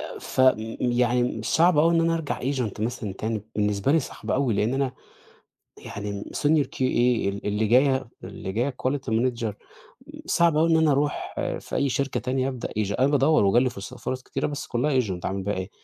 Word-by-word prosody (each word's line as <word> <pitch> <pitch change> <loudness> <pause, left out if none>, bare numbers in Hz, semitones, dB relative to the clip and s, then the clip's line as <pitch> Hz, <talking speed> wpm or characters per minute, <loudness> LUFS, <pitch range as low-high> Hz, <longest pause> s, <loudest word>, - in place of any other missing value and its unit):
آآ - - -8
فم 130 0 +3 0.3
يعني، 120 -1 +1
صعب 165 +6 +3
أوي 165 +2 +4
إن 165 - +4
أنا 165 0 +2
أرجع 165 -3 -3
agent 125 -6 -2
مثلًا 115 -3 -3
تاني، 110 +1 -3
بالنسبة 105 +5 +1
لي 165 - +4
صعب - - -7
أوي، 130 -5 +1
لأن 110 +6 +1
أنا 135 -2 0 0.9
يعني 100 0 -6
Senior 150 -1 +1
QA، - - -6 0.5
ال 100 +1 -5
اللي 105 +2 0
جاية 130 +2 +3 0.2
اللي 95 - -6
جاية 125 +5 -1
Quality 130 -2 -1
Manager، 115 -1 0 0.7
صعب 170 -2 +3
أوي 165 +2 +3
إن 165 - +5
أنا 160 -2 +4
أروح 145 +2 -1 0.3
في - - -5
أي 140 - +1
شركة 135 +1 -1
تانية 130 +1 -1
أبدأ 130 -3 -4
agent 100 -1 -1
أنا 135 - +4
بادَوّر، 145 -3 +3
وجالي 120 +6 +3
فُرصة 100 -5 -9
فُرَص 130 0 -4
كتيرة، - - -3
بس 145 -1 -5
كُلّها 130 +2 +1
agent. 95 -6 -3
أعمل 95 0 -2
بيها 100 +2 -1
إيه؟ 95 +2 -5
125 Hz, 190 wpm, -25 LUFS, 110-140 Hz, 0.9 s, إن